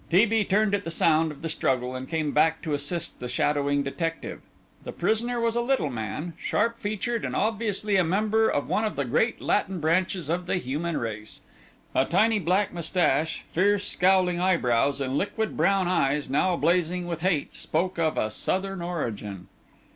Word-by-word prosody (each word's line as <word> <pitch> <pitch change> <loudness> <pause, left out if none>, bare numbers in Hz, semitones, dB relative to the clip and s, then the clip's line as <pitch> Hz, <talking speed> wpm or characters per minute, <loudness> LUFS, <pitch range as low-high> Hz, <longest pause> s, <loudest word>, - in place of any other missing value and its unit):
T. 185 +6 +5
B. 225 -1 +1
turned 205 +1 +1
at 205 0 +1
the 165 - -5
sound 160 -1 +2
of 150 - -12
the - - -1
struggle 130 -5 -1
and 130 +1 -6
came 155 -3 -1
back 160 +2 +2
to 155 -4 -2
assist 145 +4 -2
the 125 - -5
shadowing 145 +3 +1
detective. 165 +4 -4 0.4
The - - -6
prisoner 240 +2 0
was 230 0 0
a 240 - +2
little 240 - 0
man, 120 - -4
sharp 230 0 0
featured, 215 +3 -2
and - - -3
obviously 210 -2 0
a 185 - +4
member 215 +6 +2
of 145 - -1
one 215 - 0
of 215 - -2
the 140 - -1
great 190 - +1
Latin 195 -3 0
branches 175 +1 0
of 175 +2 -2
the - - +1
human 160 +2 -2
race. 110 -2 -5 0.5
A 130 - +3
tiny 215 +7 +3
black 185 +3 +1
moustache, 165 -3 0
fierce 200 +3 +2
scowling 180 -1 +3
eyebrows, 140 -7 +2
and 135 +1 0
liquid 220 +2 -2
brown 195 -2 +2
eyes 145 -5 +1
now 175 +6 +2
blazing 175 +2 +1
with 170 -2 -4
hate, 175 -5 0
spoke 175 +3 -2
of 160 -2 +1
a 110 - 0
Southern 190 - -2
origin. 110 - -5
175 Hz, 180 wpm, -26 LUFS, 145-200 Hz, 0.5 s, T